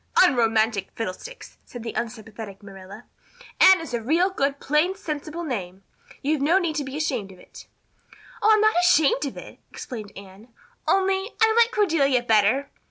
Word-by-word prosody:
"Unromantic 225 - +1
fiddlesticks!" 230 - -7
said 240 -2 -10
the 230 - -5
unsympathetic 220 -3 -7
Marilla. 195 -1 -12 0.5
"Anne 380 -1 +7
is 325 -6 -8
a 235 - -1
real 335 - +1
good 280 -5 -1
plain 305 +6 +1
sensible 315 -2 -6
name. 195 - -5 0.4
You've 295 0 0
no 320 +6 +3
need 340 -5 -1
to 290 - -1
be 270 +1 -6
ashamed 255 -11 -2
of 185 - -15
it." - - -15 0.7
"Oh, 430 - +3
I'm 430 -1 +4
not 435 0 +4
ashamed 305 -5 +3
of 270 - -8
it," - - -11
explained 215 -6 -8
Anne, 200 +3 -13 0.4
"only 385 +1 +1
I 445 0 +4
like 470 0 +5
Cordelia 315 - +1
better. 225 +4 +2
275 Hz, 165 wpm, -24 LUFS, 220-345 Hz, 0.7 s, Anne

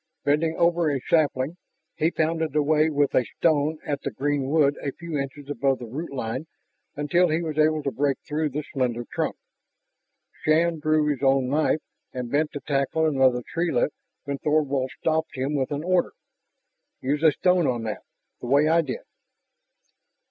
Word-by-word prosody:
Bending 160 +3 +2
over 170 -1 +3
a 140 -2 0
sapling, 150 +1 +1 0.4
he 160 - +2
pounded 160 -2 -1
away 155 +1 +3
with 145 -2 +1
a 125 - +4
stone 155 -1 +2
at 145 -4 -2
the - - -2
green 140 -1 -1
wood 145 -2 +3
a 140 - -2
few 170 -2 -7
inches 140 0 -4
above 140 -2 0
the 120 - -8
root 145 +9 -6
line 130 +3 -4 0.5
until 165 +5 +2
he 160 +2 0
was 155 -2 -3
able 155 0 +3
to 140 - -1
break 140 0 0
through 155 0 -1
the 150 +2 -4
slender 120 -3 -1
trunk. - - -1 1.1
Shann 165 +1 +2
drew 155 0 +2
his 145 -3 -1
own 135 -2 +3
knife 155 +2 +1 0.3
and 125 -2 -5
bent 150 +2 +1
to 145 - -5
tackle 140 +3 0
another 130 -5 +3
treelet 170 -3 +1 0.3
when 140 -1 -4
Thorvald 140 -3 +1
stopped 160 0 0
him 135 +3 -2
with 135 -3 0
an 145 +1 -3
order: 180 0 +1 0.9
"Use 145 +3 -1
a 160 -1 +6
stone 180 0 +2
on 120 -2 -1
that, 110 -2 -4 0.4
the - - -7
way 140 +4 +4
I 165 +1 +4
did." 135 -6 -5
150 Hz, 170 wpm, -25 LUFS, 135-160 Hz, 1.1 s, a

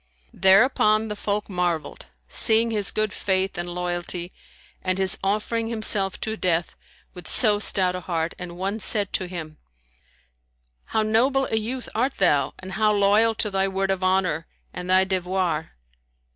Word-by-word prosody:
Thereupon 215 +2 +4
the 210 - -4
folk 205 0 -2
marvelled, 175 - -3 0.2
seeing 225 - +3
his 210 -3 -1
good 215 -2 -1
faith 190 0 -1
and 175 -1 -4
loyalty 175 0 -4 0.5
and 185 0 -1
his 190 0 +1
offering 215 +3 -1
himself 215 -4 +1
to 220 - -3
death 175 -4 -1 0.4
with 180 -3 -10
so 210 -3 +3
stout 185 -3 +2
a - - -3
heart; 165 -1 -2
and 175 -1 -7
one 195 +4 -3
said 205 -1 +1
to 185 - -1
him, 160 -4 -8 1.3
"How 220 - 0
noble 255 +5 +2
a - - +1
youth 240 +4 -4
art 255 +5 0
thou 140 -2 +1
and 185 0 -9
how 215 +2 +2
loyal 210 +2 +3
to 210 0 -2
thy 195 0 +1
word 195 0 -1
of 190 -1 -2
honour 185 -4 +1 0.3
and 180 0 -6
thy 185 0 +5
devoir!" 185 -4 -2
195 Hz, 160 wpm, -24 LUFS, 180-215 Hz, 1.3 s, thy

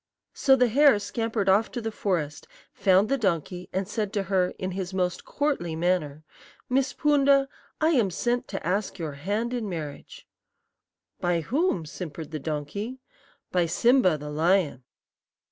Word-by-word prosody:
"So 270 -2 +4
the 250 -1 +4
hare 280 +1 +5
scampered 225 -1 -2
off 200 +4 +4
to 245 - -2
the 225 -1 -3
forest, 165 -8 -2 0.3
found 190 +1 +3
the 275 +3 0
donkey, 180 -2 -1
and 190 0 -2
said 210 -1 -2
to 200 - 0
her, 180 -1 +3
in 185 0 -3
his 190 0 -4
most 180 -2 -1
courtly 275 - -1
manner, 160 -3 0 0.5
'Miss 265 +1 +2
Poonda, 280 -2 +3 0.3
I 315 - +3
am 240 - +3
sent 240 +7 -1
to 195 - -5
ask 195 +4 -1
your 160 -3 -4
hand 205 - -2
in 230 -4 -2
marriage.' 155 -5 -7 0.9
"'By 175 -1 +1
whom?' 250 - 0
simpered 160 -1 -7
the 155 - -4
donkey. 155 - -4 0.5
"'By 175 -2 +2
Simba, 190 - +3
the 150 0 -7
lion.' 160 -4 +1
190 Hz, 155 wpm, -26 LUFS, 170-240 Hz, 0.9 s, hare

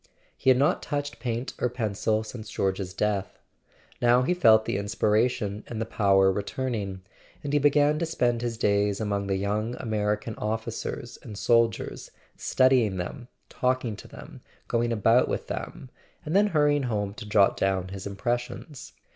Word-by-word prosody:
He - - +1
had 130 - +6
not 140 +3 +2
touched 145 -5 -4
paint 120 +1 -3
or 125 - +1
pencil 110 -2 -1
since 110 -1 -8
George's 95 -1 -2
death; 100 0 -2 0.6
now 120 +1 +4
he 175 - +2
felt 110 -10 +5
the - - -1
inspiration 105 +1 0
and 115 - -5
the 115 - -1
power 95 -4 +3
re¬ 100 - -2
turning, 100 -6 -4 0.4
and 145 0 -3
he 145 - +4
began 145 +1 +3
to 170 - -1
spend 120 -7 0
his 120 -2 -3
days 100 -2 +1
among 100 -2 -1
the 95 - 0
young 105 +4 -1
American 105 0 -1
officers 115 +2 -4
and 105 -4 -9
soldiers, 115 +3 +1 0.3
studying 125 -7 +3
them, 120 +8 -5 0.2
talking 125 -3 -1
to - - -11
them, - - -12 0.3
going 120 0 0
about 115 +3 +4
with - - -3
them, 130 - -6 0.3
and 155 +4 -2
then 205 +1 +5
hurrying 150 -5 +2
home 105 -3 -2
to 105 - -9
jot 100 -2 +4
down 95 -1 0
his 95 0 -6
impressions. 120 +7 -4
115 Hz, 165 wpm, -26 LUFS, 100-125 Hz, 0.6 s, had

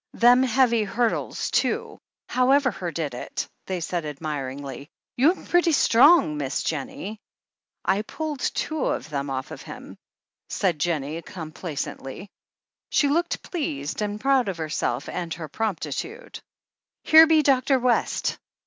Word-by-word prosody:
"Them 245 +2 +6
heavy 250 -3 +3
hurdles, 230 +3 -1
too! - - 0 0.3
However 255 +1 +3
her 175 -2 -5
did 155 -5 -3
it!" 120 - -5 0.2
they 185 -1 -2
said 175 0 -2
admiringly. 140 -2 -5 0.3
"You'm 310 +9 +2
pretty 350 -1 +3
strong 285 - +6
like. 150 - -4
Miss 140 +3 -1
ennie. 200 +8 -6 0.6
"I 195 +2 +2
pulled 300 +5 -5
two 310 +3 -2
of 145 +5 -2
them 140 -1 -2
off 130 -1 -3
him," - - -10 0.5
said 175 -6 0
Jennie 155 0 -1
com 165 -3 -8
placently. 155 +2 -6 0.6
She 285 - +3
looked 340 +4 0
pleased, 155 - -3
and 210 0 -2
proud 265 -3 +2
of 185 - -4
herself 150 -5 -2
and 175 -2 -4
her 160 -2 -7
promptitude. 220 - -4 0.6
"Here 320 +1 +8
be 315 -1 +4
Dr. 270 -1 +3
West 250 -1 0
200 Hz, 135 wpm, -25 LUFS, -, 0.6 s, Here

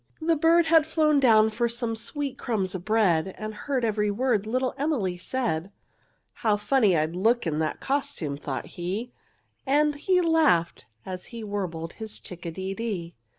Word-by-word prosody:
The 330 +1 +2
bird 330 +2 +4
had 320 -1 +5
flown 310 -2 +3
down 220 -4 +5
for 235 +2 0
some 235 -1 -2
sweet 280 +4 -4
crumbs 195 -6 -1
of 185 -2 -5
bread, 190 -5 +2
And 215 0 -5
heard 255 +2 -2
every 210 -1 +1
word 215 -1 0
little 255 +3 0
Emily 270 - -1
said. 190 -3 -2 0.6
"How 215 -2 +1
funny 210 -4 +3
I'd 155 +2 0
look 225 +6 +2
in 155 -2 -1
that 155 -1 -1
costume!" 275 - -1
thought 140 -2 -5
he, 195 +8 -5 0.5
And 295 +2 +3
he 360 +6 +1
laughed, 315 - +2 0.2
as 185 -1 -6
he 230 -2 -8
warbled 180 -6 -4
his 220 -1 -7
chick 175 -1 -9
a - - -3
de 190 +3 -4
dee. 195 -6 -4
220 Hz, 170 wpm, -26 LUFS, 185-275 Hz, 0.6 s, had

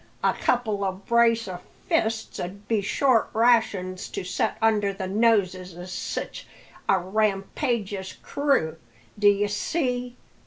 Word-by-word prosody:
a - - +4
couple 215 -5 0
o' 190 - +1
brace 230 +3 +2
o' 180 -2 -5 0.3
fists 225 -9 0
'ud 200 +3 -6
be 220 -3 +1
short 235 +3 +2
rations 215 -6 +2
to - - -4
set 180 0 -1
under 215 -3 +2
the 190 -1 -5
noses 185 -4 +1
o' 175 - -7
sich 185 - -5 0.4
a 195 - +5
rampageous 200 +1 -1
crew, 275 - 0 0.4
d'ye 205 0 +4
see. 250 +3 -2
205 Hz, 125 wpm, -25 LUFS, 190-230 Hz, 0.4 s, a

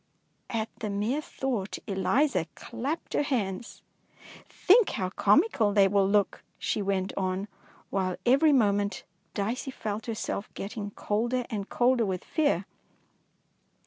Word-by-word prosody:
^^ - - -4
At 220 - -3
the 215 - -3
mere 210 +9 0
thought 245 -9 -3
Eliza 195 - +1
clapped 265 +8 -4
her - - +2
hands. 230 -7 -2 0.4
" - - -18
Think 425 +3 +5
how 185 -3 -2
comical 220 - +3
they 200 -2 +6
will 195 0 +3
look,'' 205 -1 +1
she 210 - -1
went 195 -1 -1
on, 190 +1 -1 0.4
while 185 -2 0
every 275 +5 +5
moment 205 -5 +2 0.3
Dicey 225 +6 -2
felt 220 -3 -4
herself 215 -2 -3
getting 205 0 -5
colder 235 +5 -1
and 205 -2 -3
colder 245 -1 +3
with 190 -4 -2
fear. 285 - +1
210 Hz, 135 wpm, -28 LUFS, 195-255 Hz, 0.4 s, they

